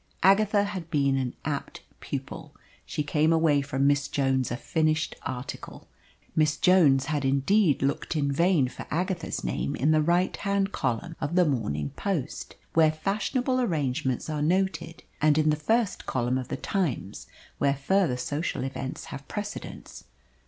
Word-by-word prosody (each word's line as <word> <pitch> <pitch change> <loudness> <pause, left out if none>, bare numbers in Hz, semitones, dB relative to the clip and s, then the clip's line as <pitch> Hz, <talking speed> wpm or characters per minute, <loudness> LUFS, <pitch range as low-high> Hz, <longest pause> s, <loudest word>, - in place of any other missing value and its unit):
Agatha 200 +1 +4
had 190 -5 -5
been 140 -4 +2
an 130 -2 -2
apt 145 -2 -4 0.2
pupil. - - -6 0.3
She 150 - -2
came 150 +2 +2
away 160 -3 +3
from 140 -1 -1
Miss 145 0 +3
Jones 135 -2 0
a 120 - -3
finished 155 +2 0
article. 125 0 -7 0.5
Miss 155 -1 +2
Jones 150 -8 +5
had 145 -1 -1
indeed 140 +5 +2
looked 140 +4 -1
in 140 -2 +1
vain 170 -2 +3
for 125 - -9
Agatha's 175 +1 -2
name 65 +3 -2
in 145 +5 +2
that 155 0 +4
right 175 +4 +2
hand 200 -1 0
column 140 +6 -2
of 160 +3 -2
the 180 -1 +5
Morning 90 - -1
Post 185 -10 -4 0.2
where 160 -1 +5
fashionable 215 - -1
arrangements 135 - -1
are 155 -2 -2
noted, 180 +1 0 0.2
and 155 -1 +4
in 155 0 +3
the - - +2
first 220 +7 0
column 125 0 0
of 125 - -6
the - - -4
Times, 150 - -2 0.3
where 140 -1 +2
further 150 -1 +1
social 145 +5 -2
events 135 0 -5
have 140 0 -8
precedence. 205 0 -7
155 Hz, 155 wpm, -27 LUFS, 135-180 Hz, 0.5 s, Jones